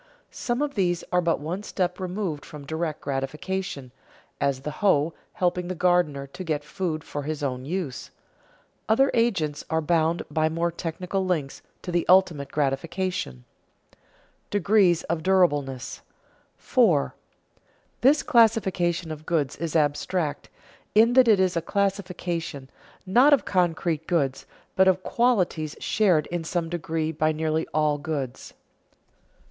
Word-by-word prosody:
Some 240 +2 -2
of 290 -1 -2
these 175 -5 0
are 180 0 +3
but 170 -1 +1
one 165 +7 -4
step 180 -3 -2
removed 185 -5 -3
from 150 -2 -10
direct 160 0 -3
gratification, 140 +1 -4 0.5
as 140 -2 0
the 150 - -4
hoe 165 -6 +3 0.2
helping 180 -1 0
the 185 - -3
gardener 175 -6 +2
to 140 +7 -9
get 155 -4 -2
food 155 -1 -3
for 145 - -5
his 150 0 -4
own 130 -2 -3
use. 165 -4 -4 0.8
Other 270 +5 +4
agents 190 -11 0
are 160 - +1
bound 165 +1 +1
by 155 -1 +1
many 170 +2 -1
technical 180 +3 -3
links 160 -7 -2 0.2
to 180 - -4
the 175 -1 +1
ultimate 170 -7 +4
gratification. 145 - -2 0.5
[Sidenote: - - -34
Degrees 195 -3 +3
of 165 -1 -2
durableness] 145 -9 +1 0.6
4. 65 -1 +2 0.9
_This 280 +4 +4
classification 190 - +2
of 155 0 -8
goods 155 -6 0
is 165 0 -4
abstract, 150 +1 0 0.5
in 230 +3 +6
that 255 -1 +6
it 215 -4 +5
is 185 -1 +2
a 170 - +1
classification, 175 -7 -2 0.3
not 250 +10 +5
of 280 - +3
concrete 170 -3 0
goods, 140 -7 0 0.3
but 190 0 +5
of 185 0 +3
qualities 185 -11 +1
shared 180 -8 +2
in 175 -1 -2
some 165 0 -2
degree 160 -2 -2
by 155 0 +1
nearly 155 0 -1
all 150 -1 +1
goods. 140 -4 -5
170 Hz, 140 wpm, -25 LUFS, 150-190 Hz, 0.9 s, in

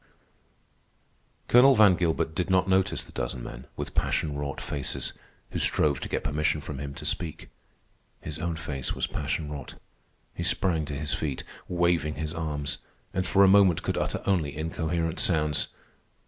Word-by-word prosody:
Colonel 130 +3 +7
Van 105 -4 +7
Gilbert 80 -2 0
did 90 +3 -1
not 95 0 +3
notice 95 0 +2
the - - -16
dozen 60 - -4
men, 60 - -8
with - - -5
passion 75 -3 0
wrought 70 -1 -3
faces, 70 -3 -3 0.4
who - - -2
strove 70 -3 +3
to - - -5
get - - -1
permission 75 +1 +1
from 75 -2 -6
him 70 0 -5
to - - -7
speak. 80 -4 -3 0.7
His 75 -2 -6
own 85 -1 -1
face 75 -5 -3
was - - 0
passion 75 +1 -3
wrought. 70 -3 -7 0.6
He - - -6
sprang 80 -5 +1
to 75 - -5
his 75 -3 -2
feet, 70 -4 -2 0.2
waving 85 -4 +1
his 75 0 -4
arms, 75 -2 -2 0.3
and 95 0 -1
for 100 - +5
a - - +7
moment 95 -3 +5
could - - -1
utter - - -1
only 80 -8 +1
incoherent 80 +1 -1
sounds. 75 -4 +2
80 Hz, 165 wpm, -27 LUFS, 75-90 Hz, 0.7 s, Colonel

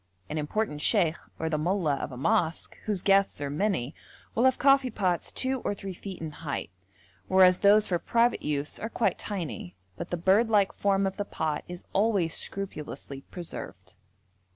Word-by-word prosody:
An 155 - -2
important 150 0 -2
sheikh, 170 -6 +3 0.2
or 160 - -2
the 155 -1 0
mollah 165 -3 +1
of - - -5
a 125 - -8
mosque, 170 - 0
whose 205 -4 -1
guests 195 -3 +3
are 140 -1 -3
many, 155 - -1 0.4
will 235 - +2
have 260 -1 +4
coffee 275 -1 +4
pots 185 -6 0
two 260 0 0
or 205 - -2
three 195 -1 -6
feet 190 +1 -8
in 160 -1 -5
height, 145 - -5 0.6
whereas 185 -1 +6
those 210 +1 +6
for 175 -2 0
private 235 +5 +2
use 145 -1 -2
are 220 - -4
quite 230 - 0
tiny, 165 - -5 0.2
but - - -6
the 175 - -2
bird 195 +7 +3
like 205 -3 +3
form 195 -1 +1
of 190 0 -2
the 205 - -1
pot 155 -6 -2
is 180 0 -8
always 195 -5 +2
scrupulously 150 -7 -4
preserved. 175 -2 -8
190 Hz, 175 wpm, -28 LUFS, 155-210 Hz, 0.6 s, whereas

